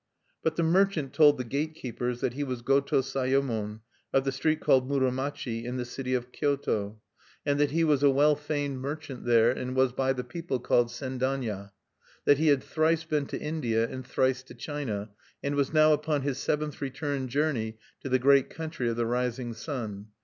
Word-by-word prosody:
But 160 -1 0
the 170 - +1
merchant 165 -5 +2
told 145 0 +6
the 125 - -2
gate 145 +6 -2
keepers 125 -3 -4
that 120 - 0
he 145 +3 -2
was 125 -3 -4
Goto 135 +1 +3
Sayemon, 130 -5 -1 0.3
of 135 - +3
the 135 - 0
street 155 +4 0
called 130 0 +3
Muromachi, 130 -3 -1
in 125 +1 -4
the 125 - -2
city 130 +1 -3
of 125 0 -3
Kyoto; 110 -8 -1 0.5
that 145 0 +2
he 165 +4 +1
was 150 -4 +3
a 145 - +6
well 145 +2 +4
famed 145 -2 -3
merchant 140 -1 -6
there, 120 -1 +5
and 125 0 -4
was 130 -1 +3
by 135 +1 +1
the 125 -1 -4
people 135 +1 -4
called 120 0 +3
Sendanya; 125 -4 -3 0.6
that 145 -1 +5
he 160 - +2
had 140 -3 +4
thrice 160 +1 +1
been 150 -3 -1
to - - -4
India 120 -8 0
and 130 +1 -6
thrice 130 0 +1
to 130 - -14
China, 115 -9 -4 0.3
and 140 - -1
was 140 -1 +1
now 155 0 +6
upon 150 -1 0
his 140 -2 -2
seventh 150 0 -2
return 140 0 -2
journey 125 -5 -1 0.2
to 135 - -6
the 130 - +4
great 140 +1 +4
country 160 -7 -3
of 115 - -1
the 120 0 0
Rising 125 0 -1
Sun. 110 -5 -5
135 Hz, 190 wpm, -28 LUFS, 125-145 Hz, 0.6 s, told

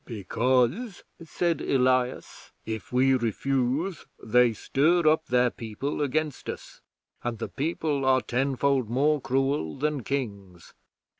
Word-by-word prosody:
"Because," 125 - 0 0.2
said 170 +1 -1
Elias, 130 -1 0
"if 110 -3 -6
we 130 +2 +3
refuse 135 - -1 0.2
they 125 +1 +4
stir 155 +9 +2
up 160 +1 +3
their 125 0 +3
people 115 +7 -5
against 150 +1 -2
us, - - -8 0.4
and 120 -1 -3
the - - -5
People 150 -1 -2
are 130 0 +4
tenfold 135 -1 0
more 145 +4 +2
cruel 135 - 0
than 150 0 -1
Kings. 100 -10 -5
130 Hz, 120 wpm, -26 LUFS, 120-145 Hz, 0.4 s, they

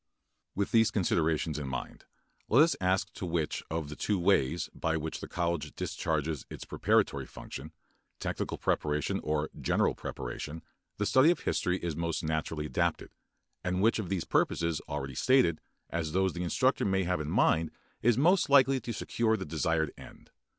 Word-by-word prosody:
With 100 0 -1
these 115 -1 +5
considerations 80 -6 0
in 70 - -4
mind 65 -1 -6 0.4
let 130 +7 +7
us 165 - +2
ask 95 +2 +1
to - - -8
which 85 -3 -1
of 80 -1 -2
the 75 - -7
two 105 +5 0
ways 85 -4 +2
by 80 0 -1
which 80 0 -4
the - - -7
college 85 -2 -2
discharges 80 -2 -2
its - - -8
preparatory - - +1
function, 75 +4 -9 0.5
technical - - -3
preparation 75 -1 0
or 75 0 -1
general - - +2
preparation, 75 +6 -6 0.3
the 105 - 0
study 130 +8 +5
of 175 - +1
history 90 0 0
is 85 -3 -2
most 85 0 -2
naturally 80 -1 -2
adapted, - - -1 0.5
and 90 +1 0
which 115 +1 +3
of 100 - -4
the 95 -2 0
purposes 85 -2 +1
already 70 -3 -4
stated 125 - +3 0.3
as 80 -2 -2
those 95 0 +2
the 90 - -4
instructor 130 +10 +1
may 95 -1 +1
have 90 -2 0
in 75 - -4
mind 80 +1 +3 0.3
is 120 0 +3
most 180 +6 +4
likely 135 -1 +6
to 120 - -5
secure 110 +2 0
the 95 - -5
desired 80 0 0
end. - - -14
85 Hz, 170 wpm, -30 LUFS, 75-100 Hz, 0.5 s, let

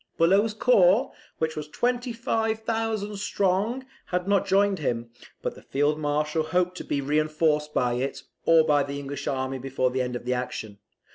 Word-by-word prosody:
Bulow's 200 +6 +3
corps, 215 +1 +4 0.3
which 160 0 -1
was 150 -1 -5
25,000 225 - -1
strong, 205 +6 0 0.2
had 180 0 -2
not 200 -2 +2
joined 200 0 +3
him; 120 -5 -2 0.3
but - - -2
the - - -14
Field 145 +2 0
Marshal 150 +1 0
hoped 180 +3 0
to - - -5
be 140 - -1
reinforced 150 +1 +1
by 125 -4 +1
it, 130 +3 -3 0.2
or 165 -1 +7
by 145 -2 +3
the 140 0 -3
English 140 0 -6
army 130 0 -2
before 130 -1 0
the 130 0 0
end 125 -1 -2
of 120 - -6
the 125 - +1
action. 110 -5 -5
155 Hz, 165 wpm, -26 LUFS, 140-205 Hz, 0.3 s, or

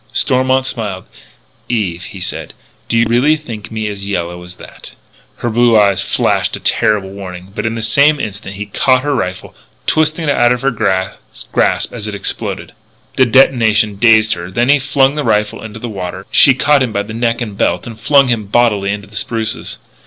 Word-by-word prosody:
Stormont 130 0 +1
smiled: 105 -7 -4 0.7
"Eve," 90 -7 -2
he 100 -1 -10
said, - - -4 0.4
"do 115 - +1
you 115 - +4
really 130 +7 +3
think 115 -8 -9
me 110 -1 -3
as 100 -1 -6
yellow 90 -2 -3
as 90 0 -11
that?" - - -13 0.4
Her 120 - -3
blue 120 0 +4
eyes 100 -2 +3
flashed - - 0
a - - -6
terrible 105 -4 0
warning, 95 -1 -9
but, 110 - -3
in 110 - -2
the 115 - -4
same 140 +7 +4
instant, 100 -1 -6
he 100 - -5
had 100 - -25
caught 130 -1 +2
her 145 0 0
rifle, 90 -8 -4 0.3
twisting 155 +1 +1
it - - +3
out 120 - +5
of 125 +1 -5
her 135 - +2
grasp 95 -5 -2
as 110 -3 -6
it 105 - -5
exploded. 100 - -4 0.4
The 130 - +4
detonation 115 -5 +3
dazed 110 -1 +4
her; 85 0 -7
then, 120 +7 0
as - - +7
he 145 - +2
flung 135 0 +2
the 150 0 -2
rifle 105 -3 0
into 110 0 -8
the 120 - -5
water, 95 -3 -6
she 135 - +6
caught 145 +1 +3
him 125 -3 0
by 100 -1 -1
neck 115 +2 -2
and 105 -4 -5
belt 90 -2 0
and 115 -2 -9
flung 140 +3 +4
him 115 -4 -1
bodily 105 -3 +2
into 100 0 -5
the 105 +1 -17
spruces. 110 0 -2
110 Hz, 200 wpm, -15 LUFS, 100-125 Hz, 0.7 s, as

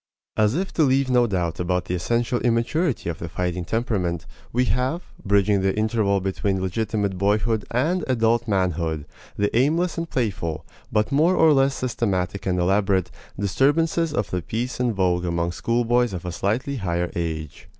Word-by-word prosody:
As 110 +3 +2
if 190 +3 -2
to - - +1
leave 135 -2 +3
no 125 -1 +4
doubt 90 -5 -2
about 90 0 0
the - - -3
essential 120 +7 0
immaturity 120 - 0
of 85 - -3
the 85 - -5
fighting 90 0 -2
temperament, 90 -5 -1 0.3
we 125 +2 +2
have, 130 +8 0 0.2
bridging 100 0 +3
the 95 +1 0
interval 110 -2 +1
between 95 +1 -1
legitimate 100 0 -1
boyhood 105 +2 +1
and 155 +9 0
adult 120 -2 +2
manhood, 85 -6 0 0.3
the 105 +1 0
aimless 165 +8 +2
and 165 0 -4
playful, 95 -10 -2 0.3
but 105 0 +1
more 160 +6 +4
or 160 -1 +5
less 135 0 +3
systematic 100 -7 -2
and 90 -1 +1
elaborate, 95 0 +2 0.3
disturbances 150 - +2
of 105 -8 -2
the 90 - -1
peace 120 +9 -3
in 125 -1 +2
vogue 90 -4 +1
among 85 0 -1
schoolboys 120 +2 +1
of 90 -1 -5
a 90 - -3
slightly 115 +10 -1
higher 90 -4 -1
age. 80 -3 -4
105 Hz, 165 wpm, -23 LUFS, 90-125 Hz, 0.3 s, or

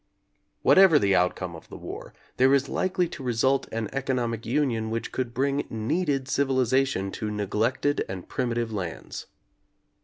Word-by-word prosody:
Whatever 190 -5 +7
the 100 -8 +3
outcome 90 -1 0
of 80 - -13
the - - -9
war, - - -8 0.3
there 135 +2 +5
is 140 0 +1
likely 180 +2 0
to - - -8
result 130 +2 +1
an 115 -1 -2
economic 125 -4 -2
union 115 -4 0
which 115 +1 -3
could 125 -2 -2
bring 140 +3 0
needed 135 +4 -1
civilization 130 -6 +1
to 110 - -4
neglected 105 +7 0
and 95 -1 -6
primitive 120 -3 -2
lands. 90 -5 -5
125 Hz, 145 wpm, -26 LUFS, 110-135 Hz, 0.3 s, Whatever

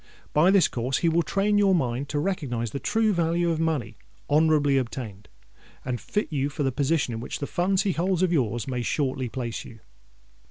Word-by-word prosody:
By 155 +5 +5
this 195 -2 +5
course 125 +2 -2
he - - +5
will 165 +1 +3
train 200 +6 +1
your 195 -2 +4
mind 130 -3 -1
to 150 - -2
recognise 140 - -2
the 140 - -4
true 220 +3 +1
value 170 0 +1
of 160 - -1
money 145 -10 -1 0.3
honourably 150 -2 +4
obtained, 115 -5 -6 0.6
and 125 -2 -3
fit 210 -5 -2
you 140 0 0
for 145 +1 -3
the 135 - +1
position 140 -1 0
in 115 - -4
which 115 - -5
the 140 - -4
funds 185 +5 +1
he 200 - +1
holds 180 +2 0
of 180 -1 +2
your's 120 -6 0
may 125 -2 -2
shortly 130 -1 -1
place 120 -2 -4
you." 110 - -13
145 Hz, 200 wpm, -25 LUFS, 125-175 Hz, 0.6 s, By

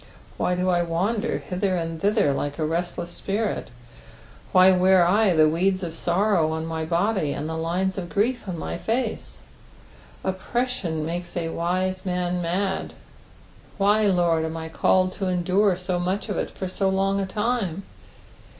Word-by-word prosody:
Why 180 - +1
do 180 +1 -1
I 175 -1 +3
wander 185 +6 -1
hither 185 +1 -1
and 165 -2 -3
thither 205 -8 +3
like 145 +1 -3
a 155 - 0
restless 175 +2 -2
spirit 205 +4 -2
f - - -18 0.8
Why 185 +1 +7
wear 185 -1 +5
I 195 0 +3
the 155 -1 +6
weeds 185 +4 +1
of 165 -2 -4
sorrow 175 -1 +1
on 160 0 -3
my 160 -1 -3
body, 175 -2 0
and 150 - -4
the 160 - -4
lines 180 +4 -1
of 175 -2 -6
grief 230 +5 0
on 180 -2 -3
my - - -4
face 230 0 -2 0.9
i - - +1
Oppression 190 -5 -2
makes 175 +2 -4
a 165 -1 -1
wise 185 +3 -1
man 180 -1 -1
mad; 190 +3 -1 0.9
wh^, 205 0 +3
Lord, 170 -2 +2
am 160 0 -3
I 160 0 -6
called 185 +3 +2
to 195 - -3
endure 185 +2 +2
so 180 -1 -2
much 185 +3 -2
of - - -2
it - - -1
for 190 - -5 0.2
ao 190 - +4
long 195 +1 +1
a 195 - -1
time 210 -3 -1
180 Hz, 170 wpm, -24 LUFS, 170-195 Hz, 0.9 s, Why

